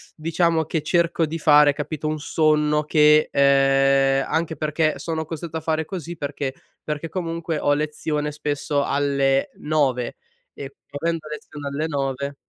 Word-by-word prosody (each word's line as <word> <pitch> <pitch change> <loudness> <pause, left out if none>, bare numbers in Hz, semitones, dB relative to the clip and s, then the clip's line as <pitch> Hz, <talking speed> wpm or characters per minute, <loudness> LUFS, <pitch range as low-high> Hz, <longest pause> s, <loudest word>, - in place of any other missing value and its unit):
diciamo 165 0 +1
che 160 +1 -2
cerco 170 +1 +1
di 160 +2 -4
fare, 150 -2 +5
capito, 150 +1 -4
un 155 0 -2
sonno 150 -1 +1
che 150 0 +4
ehm, 135 0 +3
anche 160 0 -1
perché 155 0 0
sono 160 +2 -3
costretto 160 +1 -6
a - - -5
fare 160 0 -1
così 175 -1 -6
perché: 140 -2 -4 0.3
perché 150 +1 -4
comunque 165 -2 -3
ho 145 - +2
lezione 150 0 -2
spesso 145 -1 -2
alle 140 -1 +1
9, 135 -5 0 0.4
e 140 0 -9 0.3
avendo 165 -1 -1
lezione 150 -1 -8
alle 150 +3 -2
9 140 -1 -3
150 Hz, 145 wpm, -22 LUFS, 140-160 Hz, 0.4 s, fare